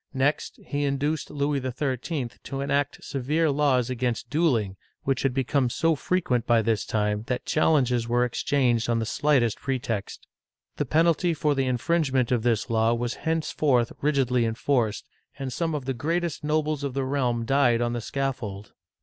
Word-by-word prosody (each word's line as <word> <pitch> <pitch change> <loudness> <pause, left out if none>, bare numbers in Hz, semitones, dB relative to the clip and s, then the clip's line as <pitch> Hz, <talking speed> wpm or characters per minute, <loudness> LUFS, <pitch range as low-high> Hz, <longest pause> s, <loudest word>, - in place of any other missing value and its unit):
Next, 135 +3 0
he 145 0 -2
induced 145 +2 -1
Louis 145 -1 0
XIII. 130 +1 -2 0.2
to 135 - -4
enact 140 0 -1
severe 150 +4 0
laws 135 -4 +2
against 125 -2 -2
dueling, 125 - +1 0.3
which 135 -2 0
had 135 - +1
become 135 0 +1
so 165 +6 +2
frequent 145 -7 0
by 115 -2 +4
this 110 -1 0
time 105 -1 0
that 125 -2 -2
challenges 125 -7 +2
were 120 +1 +3
exchanged 120 -1 +1
on 115 - +2
the 115 - -1
slightest 125 -3 +1
pretext. 120 -6 -3 0.5
The 145 - 0
penalty 165 +4 +2
for 150 0 +1
the 135 -2 0
infringement 130 -1 +1
of 120 -2 +2
this 115 -1 +1
law 115 0 +2
was 120 +1 -2 0.2
henceforth 150 -6 +1
rigidly 135 -4 +2
enforced, 115 -1 0 0.3
and 135 -2 -4
some 165 +1 -1
of 140 -3 -4
the 135 - -1
greatest 165 +5 -2
nobles 150 -1 0
of 135 -2 -3
the 135 -1 0
realm 125 -4 0
died 125 -3 +3
on 120 0 0
the 120 - -3
scaffold. 120 -7 -4
130 Hz, 165 wpm, -26 LUFS, 120-145 Hz, 0.5 s, by